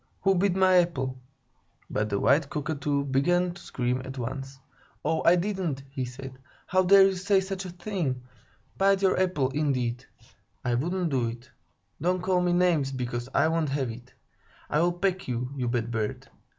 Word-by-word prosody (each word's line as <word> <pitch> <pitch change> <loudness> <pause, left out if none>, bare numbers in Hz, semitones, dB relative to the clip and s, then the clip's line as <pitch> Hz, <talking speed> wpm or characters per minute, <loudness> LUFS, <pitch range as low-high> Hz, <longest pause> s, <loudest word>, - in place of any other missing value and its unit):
Who 195 0 +4
bit 190 0 +2
my 185 -1 +5
apple?" 135 -7 +1 0.7
But 105 0 -1
the 100 -1 0
white 140 +5 +3
Cockatoo 145 -1 -1
began 175 +7 +2
to - - -13
scream 125 0 -2
at 135 +1 -8
once. 135 +2 -5 0.5
"'Oh, 160 - +1
I 170 - +7
didn't!" 180 -7 -2
he 135 -2 -3
said. 130 +1 -9 0.3
"How 185 +1 +2
dare 195 +1 +7
you 195 0 +4
say 195 +2 +2
such 190 0 -4
a - - -5
thing? 175 -8 -3 0.6
Bite 195 0 +3
your 190 - +3
apple, 150 -8 +1
indeed! 130 -4 -1 0.6
I 120 - +1
wouldn't 170 +7 -1
do 125 -3 +1
it. 120 +3 -8 0.5
Don't 180 +3 +1
call 185 -1 +2
me 180 0 +1
names, 175 -6 +2
because 125 -1 -4
I 155 - +4
won't 160 -2 0
have 135 -3 -1
it. 120 +2 -12 0.6
I'll 170 +4 +3
peck 185 +1 -1
you, 125 +1 -3
you 125 -3 -2
bad 120 -1 -1
bird! 110 -2 -3
145 Hz, 175 wpm, -27 LUFS, 130-180 Hz, 0.7 s, I